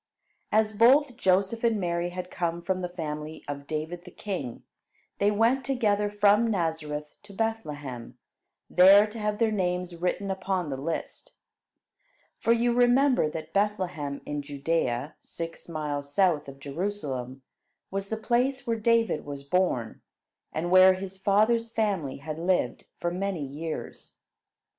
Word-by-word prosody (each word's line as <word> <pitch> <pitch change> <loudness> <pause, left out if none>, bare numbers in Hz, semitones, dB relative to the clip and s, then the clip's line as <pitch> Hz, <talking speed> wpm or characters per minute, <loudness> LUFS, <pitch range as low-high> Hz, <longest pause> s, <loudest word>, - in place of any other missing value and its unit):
As 215 0 +2
both 255 +4 +5
Joseph 195 +1 +1
and 230 -3 +2
Mary 175 -1 -1
had 180 0 -6
come 170 -1 -2
from 185 0 -1
the 180 - -3
family 155 -2 -6
of 140 0 -6
David 160 +3 -4
the 180 - -11
king, 175 - -5 0.6
they 200 - +4
went 230 +6 +2
together 215 -6 +1
from 205 +2 +4
Nazareth 160 -6 -2
to 205 - -15
Bethlehem, 145 - -4 0.5
there 195 +3 +7
to 215 +1 -8
have 210 0 -1
their 225 -1 +2
names 180 -3 -1
written 180 +3 -1
upon 190 -4 -2
the - - -1
list. 150 +5 -5 1.1
For 230 - +2
you 235 +1 +3
remember 245 - +4
that 160 0 -7
Bethlehem 185 -9 -1
in 145 0 -3
Judea, 145 -2 -1
six 165 0 -7
miles 145 -3 -3
south 170 -4 +2
of 135 0 -9
Jerusalem, 140 -5 -4 0.5
was 195 0 -3
the 220 - -2
place 250 +4 0
where 230 -1 -1
David 230 -5 +2
was 140 -1 -7
born, 140 -8 0 0.5
and 170 +3 -2
where 185 0 +8
his 190 0 -6
father's 220 +4 +2
family 195 -12 -1
had 155 +3 -6
lived 175 -8 0
for 175 - -2
many 185 -4 -2
years. 155 +4 -7
180 Hz, 145 wpm, -27 LUFS, 150-210 Hz, 1.1 s, where